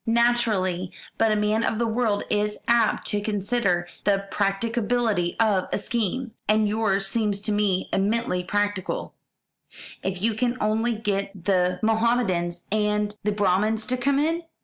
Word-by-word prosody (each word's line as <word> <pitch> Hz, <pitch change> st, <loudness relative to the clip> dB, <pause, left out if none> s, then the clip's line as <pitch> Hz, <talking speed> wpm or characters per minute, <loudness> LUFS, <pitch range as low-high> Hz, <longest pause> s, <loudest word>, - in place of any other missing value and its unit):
"Naturally. 225 Hz, -6 st, +1 dB, 0.3 s
But 225 Hz, -1 st, +4 dB
a -, -, +3 dB
man 210 Hz, +2 st, +1 dB
of 220 Hz, -, 0 dB
the 235 Hz, -, +1 dB
world 220 Hz, -2 st, 0 dB
is 210 Hz, 0 st, 0 dB
apt 235 Hz, -2 st, +3 dB
to 205 Hz, -, 0 dB
consider 200 Hz, -3 st, 0 dB, 0.2 s
the 200 Hz, -1 st, +1 dB
practicability 210 Hz, -2 st, 0 dB
of 210 Hz, -5 st, +2 dB
a -, -, +1 dB
scheme. 235 Hz, +2 st, -2 dB, 0.2 s
And 215 Hz, 0 st, +3 dB
yours 205 Hz, -2 st, +1 dB
seems 205 Hz, -1 st, 0 dB
to 210 Hz, -, -1 dB
me 205 Hz, -3 st, +1 dB
eminently 200 Hz, -2 st, 0 dB
practical. 205 Hz, 0 st, -2 dB, 0.9 s
If 190 Hz, -1 st, -3 dB
you 225 Hz, +4 st, +1 dB
can 240 Hz, +3 st, -1 dB
only 225 Hz, +2 st, +1 dB
get 200 Hz, -3 st, -3 dB
the 180 Hz, -2 st, +2 dB
Mohamedans 220 Hz, -7 st, +1 dB
and 210 Hz, 0 st, 0 dB
the 210 Hz, -, +1 dB
Brahmins 210 Hz, +2 st, +1 dB
to 250 Hz, -, 0 dB
come 275 Hz, +2 st, +1 dB
in! 325 Hz, +4 st, +1 dB
210 Hz, 150 wpm, -25 LUFS, 195-230 Hz, 0.9 s, But